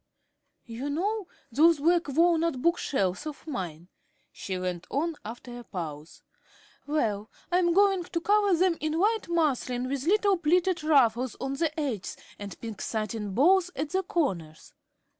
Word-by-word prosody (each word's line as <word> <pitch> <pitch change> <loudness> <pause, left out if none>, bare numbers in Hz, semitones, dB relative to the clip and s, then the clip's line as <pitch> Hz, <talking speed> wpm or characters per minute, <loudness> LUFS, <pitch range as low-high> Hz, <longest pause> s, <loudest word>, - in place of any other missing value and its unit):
"You 240 +4 -5
know 395 +6 -1 0.2
those 320 +6 +5
black 340 +3 +2
walnut 330 0 +2
book 340 +6 +2
shelves 195 +2 -1
of 300 -1 -8
mine," 175 - -5 0.4
she 190 -2 -5
went 180 -1 -4
on, 320 +4 -1
after 240 +2 -8
a - - -10
pause; 160 -7 -7 0.6
"well, 220 -8 -1 0.2
I 355 - +4
am 345 -1 +3
going 390 -1 +3
to 340 -1 -2
cover 405 +1 +3
them 360 -1 +2
in 310 +1 -1
white 430 +2 +1
muslin 260 -7 0
with 275 +2 -3
little 405 0 +3
pleated 345 +1 +2
ruffles 255 -5 +3
on 270 0 -3
the 315 +3 0
edges 250 -10 -3 0.2
and 200 -3 -8
pink 225 -3 -6
satin 215 -2 -3
bows 360 - +4
at 295 +2 -3
the 380 - +1
corners. 185 - -3
295 Hz, 155 wpm, -28 LUFS, 225-345 Hz, 0.6 s, those